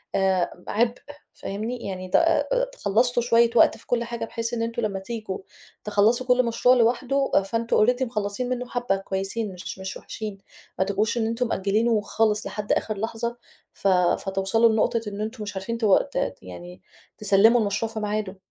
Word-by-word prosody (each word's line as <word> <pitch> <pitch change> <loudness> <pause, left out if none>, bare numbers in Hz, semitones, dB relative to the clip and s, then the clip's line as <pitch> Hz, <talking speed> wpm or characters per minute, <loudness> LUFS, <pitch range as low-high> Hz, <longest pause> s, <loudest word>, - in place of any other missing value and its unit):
آآ 185 -2 0
عبء 235 +2 +1 0.4
فاهمني، 225 +4 -5
يعني 185 -1 -5
ت 180 - 0
آآ، - - +2
خلصتوا 240 - +2
شوية 235 -1 +4
وقت - - +5
في - - -18
كل 240 -1 +1
حاجة 235 -1 -4
بحيث 230 +1 -4
إن 230 - -1
أنتم 230 +1 -2
لمّا 200 -3 -2
تيجوا 215 -1 -5 0.5
تخلّصوا 215 +4 +2
كل 250 0 +4
مشروع 245 +2 +3
لوحده، 255 +3 +1
فأنتم 230 +1 +2
already 250 +1 +1
مخلصين 225 +1 -3
منه 250 0 -3
حبّة 245 -5 0
كويسين، 195 +2 -3
مش 180 +1 -8
مش 190 0 -5
وحشين 210 -3 -7 0.4
ما 190 - +3
تبقوش 210 +4 0
إن 225 -1 +1
أنتم 230 +2 -1
مأجلينه 215 +2 +1
خالص 215 0 0
لحد 210 -1 -4
آخر 215 -2 0
لحظة 230 +3 -3 0.4
ف 195 - -3
فتوصلوا 195 +4 +2
لنقطة 225 +1 +1
إن 205 0 -5
أنتم 220 +1 -4
مش 205 -1 -6
عارفين 190 +5 -3
ت 230 - -1 0.3
ت - - -1
يعني 90 0 -10 0.4
تسلّموا 210 +3 +5
المشروع 210 +2 -1
في 220 - -4
ميعاده. 210 -2 -3
220 Hz, 170 wpm, -24 LUFS, 195-235 Hz, 0.5 s, وقت